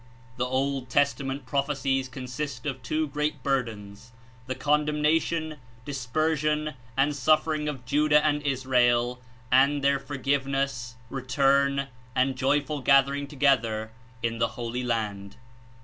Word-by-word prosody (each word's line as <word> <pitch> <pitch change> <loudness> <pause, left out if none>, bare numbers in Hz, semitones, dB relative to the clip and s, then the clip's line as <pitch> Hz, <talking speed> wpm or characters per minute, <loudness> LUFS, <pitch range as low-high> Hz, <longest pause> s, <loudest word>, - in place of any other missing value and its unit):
The 125 0 0
Old 130 0 -1
Testament 140 0 0
prophecies 135 -1 0
consist 130 +1 -5
of 135 -3 -3
two 155 +5 -1
great 150 -1 -2
burdens 115 -5 -3 0.2
— 125 +2 -26
the 130 - -2
condemnation, 150 +2 +1 0.3
dispersion 150 +3 0 0.2
and 145 +2 +2
suf 155 +3 +3
fering 155 -2 -1
of 135 -4 -7
Judah 150 +3 +3
and 150 -1 +2
Israel, 125 -3 +1 0.3
and 140 +2 +4
their 140 0 +3
forgiveness, 135 -2 -2
41 135 0 -5 0.5
return 140 0 -2 0.3
and 130 +1 +2
joyful 145 +2 0
gathering 140 +1 +3
together 120 -7 +1 0.3
In 115 0 -1
the - - +3
Holy 120 +1 -3
Land. 105 -4 -3
135 Hz, 125 wpm, -27 LUFS, 125-145 Hz, 0.5 s, and